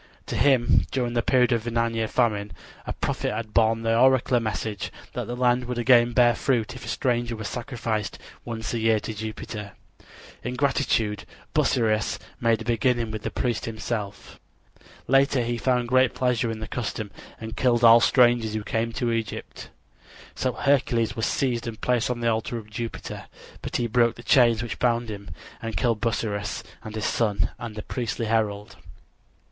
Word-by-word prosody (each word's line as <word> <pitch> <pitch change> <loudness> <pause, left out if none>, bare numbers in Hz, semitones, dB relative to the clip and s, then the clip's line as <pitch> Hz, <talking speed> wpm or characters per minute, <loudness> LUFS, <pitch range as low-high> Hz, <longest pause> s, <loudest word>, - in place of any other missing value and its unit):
To - - -4
him 130 -4 +3
during 125 -3 -1
the 120 - +2
period 125 +1 +3
of 115 -1 0
a - - +1
nine 115 0 0
year 115 -1 -1
famine 105 -5 0 0.3
a - - -2
prophet - - -2
had 110 0 -5
borne 115 0 +3
the 115 0 +2
oracular 130 0 +4
message 110 -2 -3 0.2
that - - -4
the 120 - -4
land 125 0 +2
would 125 0 -4
again 120 0 +5
bear 120 -1 +5
fruit 120 -2 0
if 130 - -9
a - - -8
stranger 120 -1 0
were 110 - -7
sacrificed 115 -3 -3 0.3
once 115 -1 -5
a 115 - -1
year 110 -1 +3
to 110 - -5
Jupiter. 105 -1 -6 0.7
In 125 +2 -3
gratitude 125 -6 0 0.3
Busiris 110 -3 +1 0.2
made 115 -1 +2
a - - -15
beginning 120 -1 +1
with 110 -1 -5
the - - -3
priest 120 -3 -2
himself. 110 -2 -5 0.7
Later 135 -1 +3
he 120 0 -2
found 125 -1 +1
great 130 +1 +3
pleasure 125 -2 +1
in 110 -1 -5
the 110 - -5
custom 110 -3 -4 0.3
and 110 0 -7
killed 120 -2 +2
all 115 0 +9
strangers 120 -3 +3
who 110 - -2
came 115 +2 -1
to 120 -1 -1
Egypt. 115 -1 -4 0.6
So 130 -1 -1
Hercules 120 -5 +1
was 115 - 0
seized 120 -4 -1
and 110 -2 -6
placed 125 -2 +1
on 120 -1 -2
the 115 - +1
altar 115 +1 0
of 110 -1 -10
Jupiter. 115 +2 -6 0.4
But - - -6
he 120 - +1
broke 120 0 +2
the 120 - -11
chains 120 -3 +4
which 120 - -5
bound 120 -1 +1
him, 100 -1 -7 0.3
and 115 -1 -4
killed 115 -4 +1
Busiris 105 -3 -2 0.2
and 110 -1 -8
his 110 - -2
son 105 -3 +1
and 115 -2 -6
the 105 - -6
priestly 120 -2 -3
herald. 105 -2 -1
115 Hz, 180 wpm, -25 LUFS, 110-120 Hz, 0.7 s, all